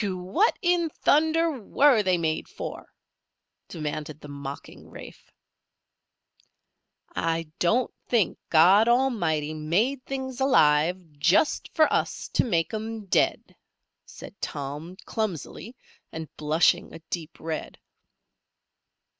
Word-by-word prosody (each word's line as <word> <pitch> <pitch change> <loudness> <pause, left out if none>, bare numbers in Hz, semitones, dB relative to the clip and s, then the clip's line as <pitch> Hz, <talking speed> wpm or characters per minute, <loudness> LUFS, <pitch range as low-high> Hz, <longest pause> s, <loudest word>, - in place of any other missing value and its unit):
"Whew! 195 -3 -2
What 190 - +1
in 350 -2 +2
thunder 320 +2 +2
were 265 +2 +4
they 185 -3 +2
made 160 -2 -2
for?" - - -8 0.8
demanded 150 -1 -5
the 150 - -11
mocking 140 -1 -9
Rafe. - - -12 1.9
"I 165 -1 -1
don't 235 +9 +1
think 225 -8 +1
God 185 +7 +6
Almighty 190 - +1
made 200 - 0
things 265 -1 -5
alive 175 - +3
just 175 - +2
for 315 - +6
us - - -1
to - - +1
make 170 -8 0
'em 220 0 -5
dead," 190 - 0 0.5
said - - -12
Tom, 145 +6 -5
clumsily, 220 - -4 0.4
and 160 -1 -8
blushing 155 +2 +1
a - - -9
deep 165 -2 -5
red. 160 0 -5
180 Hz, 110 wpm, -26 LUFS, 155-245 Hz, 1.9 s, God